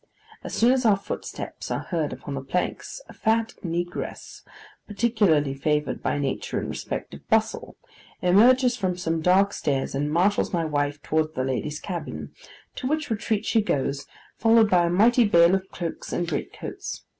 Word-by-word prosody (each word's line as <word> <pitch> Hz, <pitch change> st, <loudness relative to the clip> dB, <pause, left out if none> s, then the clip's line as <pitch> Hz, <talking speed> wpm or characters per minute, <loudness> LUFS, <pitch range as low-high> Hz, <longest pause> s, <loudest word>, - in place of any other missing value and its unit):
As -, -, -5 dB
soon 235 Hz, +2 st, +4 dB
as 260 Hz, 0 st, +2 dB
our 210 Hz, -4 st, +4 dB
footsteps 195 Hz, -, -6 dB
are -, -, -2 dB
heard 160 Hz, -5 st, -2 dB
upon 145 Hz, -, -7 dB
the 135 Hz, -, -3 dB
planks, 180 Hz, -, -3 dB
a -, -, -12 dB
fat 225 Hz, 0 st, 0 dB
negress, 175 Hz, 0 st, -4 dB, 0.5 s
particularly 205 Hz, -, +2 dB
favoured 150 Hz, +2 st, -1 dB
by -, -, 0 dB
nature 140 Hz, -2 st, -2 dB
in -, -, -4 dB
respect -, -, -5 dB
of -, -, -12 dB
bustle, -, -, 0 dB, 0.4 s
emerges 245 Hz, +7 st, +5 dB
from 185 Hz, -6 st, -2 dB
some 165 Hz, -2 st, -1 dB
dark 190 Hz, +4 st, +4 dB
stairs, 135 Hz, -2 st, -1 dB
and 145 Hz, +2 st, -1 dB
marshals 185 Hz, +6 st, +2 dB
my 170 Hz, -2 st, 0 dB
wife 145 Hz, -1 st, -1 dB
towards 155 Hz, 0 st, 0 dB
the 130 Hz, -, -1 dB
ladies' 140 Hz, +3 st, -2 dB
cabin, 180 Hz, -3 st, -6 dB, 0.4 s
to 255 Hz, -, -3 dB
which 305 Hz, -2 st, -1 dB
retreat 215 Hz, -1 st, -1 dB
she 225 Hz, -, +3 dB
goes, 140 Hz, -6 st, -1 dB, 0.3 s
followed 225 Hz, -2 st, +5 dB
by 175 Hz, -2 st, +4 dB
a -, -, 0 dB
mighty 230 Hz, +7 st, +4 dB
bale 170 Hz, -4 st, +5 dB
of 190 Hz, 0 st, -1 dB
cloaks 170 Hz, -2 st, -6 dB
and 175 Hz, -, -1 dB
great 165 Hz, -, -3 dB
coats. -, -, -7 dB
180 Hz, 170 wpm, -25 LUFS, 150-220 Hz, 0.5 s, emerges